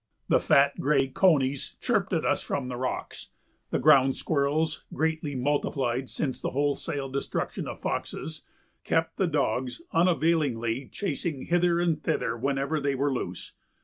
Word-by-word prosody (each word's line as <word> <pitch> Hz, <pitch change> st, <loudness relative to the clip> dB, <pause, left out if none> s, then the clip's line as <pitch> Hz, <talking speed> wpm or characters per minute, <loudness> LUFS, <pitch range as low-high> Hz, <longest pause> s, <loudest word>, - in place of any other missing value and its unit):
The -, -, +5 dB
fat, 140 Hz, 0 st, +3 dB
gray 135 Hz, -1 st, +2 dB
conies 140 Hz, -4 st, +2 dB
chirped -, -, 0 dB
at -, -, 0 dB
us -, -, +2 dB
from 130 Hz, -3 st, -3 dB
the 125 Hz, -, -4 dB
rocks; 130 Hz, +1 st, -4 dB, 0.4 s
the -, -, 0 dB
ground 135 Hz, -3 st, +5 dB
squirrels, 155 Hz, +1 st, 0 dB
greatly 160 Hz, -2 st, -1 dB
multiplied 130 Hz, -2 st, 0 dB
since 135 Hz, -5 st, -3 dB
the -, -, -1 dB
wholesale 140 Hz, 0 st, -1 dB
destruction 135 Hz, +1 st, -3 dB
of -, -, -7 dB
foxes, 155 Hz, -1 st, -4 dB, 0.4 s
kept 165 Hz, 0 st, 0 dB
the 190 Hz, -, +2 dB
dogs 130 Hz, -5 st, -1 dB
unavailingly 150 Hz, -8 st, +1 dB
chasing 160 Hz, -6 st, -3 dB
hither 175 Hz, 0 st, +2 dB
and 165 Hz, -3 st, +1 dB
thither 115 Hz, -5 st, -1 dB
whenever 140 Hz, +5 st, -1 dB
they 140 Hz, -1 st, 0 dB
were 140 Hz, +1 st, +1 dB
loose. 90 Hz, -8 st, -5 dB
140 Hz, 145 wpm, -27 LUFS, 130-160 Hz, 0.4 s, The